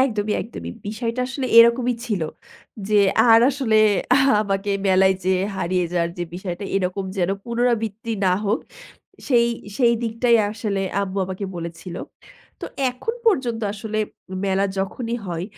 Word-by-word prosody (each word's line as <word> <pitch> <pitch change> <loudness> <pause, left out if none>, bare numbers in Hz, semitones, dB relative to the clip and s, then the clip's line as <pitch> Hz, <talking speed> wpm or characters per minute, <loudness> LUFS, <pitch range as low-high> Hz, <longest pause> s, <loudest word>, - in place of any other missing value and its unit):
একদমই, 215 -5 +1
একদমই। 85 - -7 0.2
বিষয়টা 230 +3 -3
আসলে 265 -1 -3
এরকমই 235 +1 +5
ছিল। 200 -7 -1 0.7
যে 210 -1 +4 0.3
আর 225 0 +8
আসলে 260 -5 0 0.6
আমাকে 200 -1 -1 0.2
মেলায় 190 0 +4
যেয়ে 185 0 +2
হারিয়ে 180 -1 0
যাওয়ার 170 -1 0
যে 175 - -1
বিষয়টা 185 +1 -5
এরকম 190 +1 -1
যেন 180 +1 +1
পুনরাবৃত্তি 230 -2 -1
না 185 - +4
হোক 210 +3 +1 0.7
সেই 235 -3 +4 0.3
সেই 235 -3 +4
দিকটাই 230 +1 +2
আসলে 210 -3 -2 0.2
আম্মু 195 0 -4
আমাকে 190 +2 -5
বলেছিল। 170 +1 -7 0.7
তো - - -4 0.2
এখন 450 - -4
পর্যন্ত 245 - +2
আসলে 215 +1 -4 0.5
মেলা 195 0 +1
যখনই 230 +5 -2
হয়, 170 -1 -3
210 Hz, 135 wpm, -22 LUFS, 190-235 Hz, 0.7 s, আর